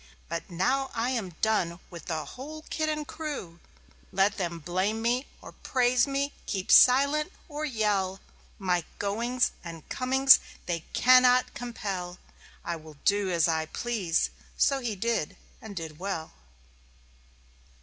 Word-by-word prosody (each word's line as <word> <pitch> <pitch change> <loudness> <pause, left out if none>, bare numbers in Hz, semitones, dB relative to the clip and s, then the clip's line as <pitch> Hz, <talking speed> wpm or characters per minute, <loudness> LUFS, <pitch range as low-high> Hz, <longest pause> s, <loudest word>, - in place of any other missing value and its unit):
But - - -4
now 260 +10 0
I 235 +2 0
am 200 -9 -3
done 180 -6 +1
with 170 -2 -9
the 155 -3 -3
whole 300 - -9
kit 310 -1 0
and 305 -1 -3
crew. 285 - -6 0.5
"Let 195 +2 +2
them 170 -3 -2
blame 185 +7 -1
me 240 +4 0 0.2
or - - -9
praise 250 -1 +2
me, 280 +1 -1
keep 190 -2 -2
silent 280 +6 +6 0.2
or 305 -1 -4
yell, 205 -7 0 0.4
My 180 -3 0
goings 235 +5 0
and 165 -2 -9
comings 265 +1 +6 0.3
they 170 -2 -3
cannot 255 0 +5
compel. 195 -7 -5 0.5
I 170 - -2
will 155 -2 -13
do 205 -1 +2
as 170 -2 +3
I 160 -1 0
please!"...So 230 - -1
he 235 -5 -3
did 225 -5 -1 0.2
and 215 -2 -9
did 160 -3 -6
well. 185 -4 -4
210 Hz, 135 wpm, -28 LUFS, 175-255 Hz, 0.5 s, silent